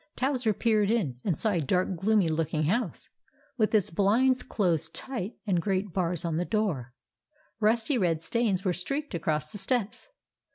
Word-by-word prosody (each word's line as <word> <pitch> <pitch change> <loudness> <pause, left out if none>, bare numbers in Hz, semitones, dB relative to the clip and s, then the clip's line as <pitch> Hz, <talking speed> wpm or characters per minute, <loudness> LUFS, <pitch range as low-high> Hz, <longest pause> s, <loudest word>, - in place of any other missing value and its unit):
Towser 255 -4 +1
peered 215 -1 +2
in 170 - 0
and 175 -7 0
saw 220 - +1
a 175 -4 +1
dark 180 +6 0
gloomy 200 +1 +2
looking 155 -1 0
house, 200 +5 -1 0.4
with 220 -4 +1
its 205 -6 +2
blinds 235 +8 +3
closed 175 -7 -1
tight, 240 -6 -4
and 185 -5 +1
great 195 0 -1
bars 175 -2 -1
on 165 -2 -1
the 175 - +1
door. 175 - -2 0.6
Rusty 225 +4 +2
red 170 -5 +1
stains 200 +1 0
were 185 - +2
streaked 275 - -4
across 155 -2 -1
the 205 - -5
steps. 235 - -1
195 Hz, 165 wpm, -28 LUFS, 170-225 Hz, 0.6 s, blinds